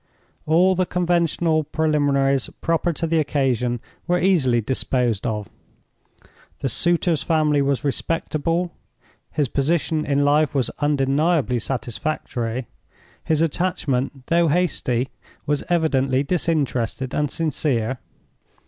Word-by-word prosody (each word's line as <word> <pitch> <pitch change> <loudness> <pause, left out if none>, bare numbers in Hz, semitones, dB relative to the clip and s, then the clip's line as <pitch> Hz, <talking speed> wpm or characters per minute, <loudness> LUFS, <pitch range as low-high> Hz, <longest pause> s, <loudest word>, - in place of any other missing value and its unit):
All 175 +4 +4
the 185 -1 0
conventional 170 -2 +1
preliminaries 140 -3 +1
proper 165 +1 +1
to 165 - -2
the 165 0 +1
occasion 130 -5 0 0.3
were 180 0 +2
easily 155 -11 +3
disposed 125 -1 0
of. 105 -3 -3 1.1
The 135 - 0
suitor's 170 +3 +2
family 155 -3 +2
was 140 0 0
respectable; 165 +4 -1 0.6
his 145 -3 0
position 155 +3 0
in 145 -1 +1
life 150 +1 +2
was 130 -3 +1
undeniably 145 -1 +1
satisfactory; 120 0 -3 0.6
his 160 0 +2
attachment, 140 -6 -1
though 170 +2 +3
hasty, 140 -7 0 0.4
was 145 0 0
evidently 140 -6 +2
disinterested 140 -6 -1
and 150 -1 0
sincere. 130 -7 -1
145 Hz, 105 wpm, -22 LUFS, 130-165 Hz, 1.1 s, All